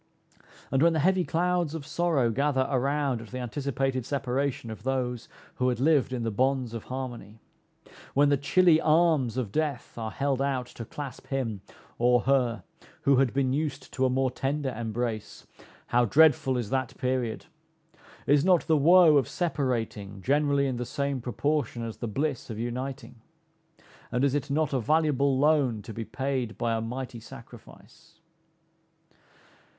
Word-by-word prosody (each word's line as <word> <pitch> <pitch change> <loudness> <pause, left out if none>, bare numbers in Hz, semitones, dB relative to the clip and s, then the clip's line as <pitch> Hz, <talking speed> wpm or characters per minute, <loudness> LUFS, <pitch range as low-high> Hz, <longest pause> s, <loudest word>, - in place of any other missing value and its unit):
And 135 - +2
when 170 +1 +5
the 160 - 0
heavy 190 -1 +3
clouds 175 -2 0
of 150 -3 -6
sorrow 155 -8 +1
gather 135 +1 +1
around 135 -1 0
at 115 - -10
the 130 - -7
anticipated 135 +1 -2
separation 135 -1 -2
of 110 - -8
those 125 -2 -2 0.3
who 125 0 +2
had 120 -2 -2
lived 145 -1 +3
in 125 -2 -2
the 115 - -1
bonds 130 +1 0
of 115 - -6
harmony 120 -5 -6 0.8
when 145 +1 +5
the 145 - +4
chilly 160 +4 +4
arms 155 -7 +3
of 120 -6 -2
death 150 -4 -2
are 110 -1 -3
held 135 +2 -1
out 135 -2 -1
to 115 -1 -9
clasp 140 +1 -8
him, 115 -8 -3 0.4
or 120 0 +4
her, 125 -6 +1 0.4
who 140 -1 +4
had 130 -2 +3
been 130 -1 0
used 145 -2 -3
to 130 - -1
a 130 - +4
more 130 0 +1
tender 135 +1 -2
embrace, 115 -1 -4 0.4
how 120 0 +2
dreadful 150 0 +4
is 115 -4 -4
that 130 -1 -2
period! 125 -3 -2 0.8
Is 145 0 +4
not 180 -3 +3
the 160 - +3
woe 165 +1 +6
of 135 - +2
separating 115 - -2
generally 140 0 +2
in 130 -3 -2
the 125 - -2
same 140 +1 -2
proportion 125 -1 -1
as 115 -1 -6
the 120 - -4
bliss 135 +4 -2
of 110 - -5
uniting? 120 +1 -5 0.9
And 125 +1 0
is 140 -2 +2
it 145 -2 -2
not 150 0 0
a 135 - +2
valuable 140 0 +2
loan 135 -7 +2
to 110 - -8
be 115 +1 -5
paid 130 -4 -3
by 115 -1 0
a 115 - -1
mighty 125 +1 -5
sacrifice? 115 - -14
130 Hz, 165 wpm, -27 LUFS, 120-145 Hz, 0.9 s, woe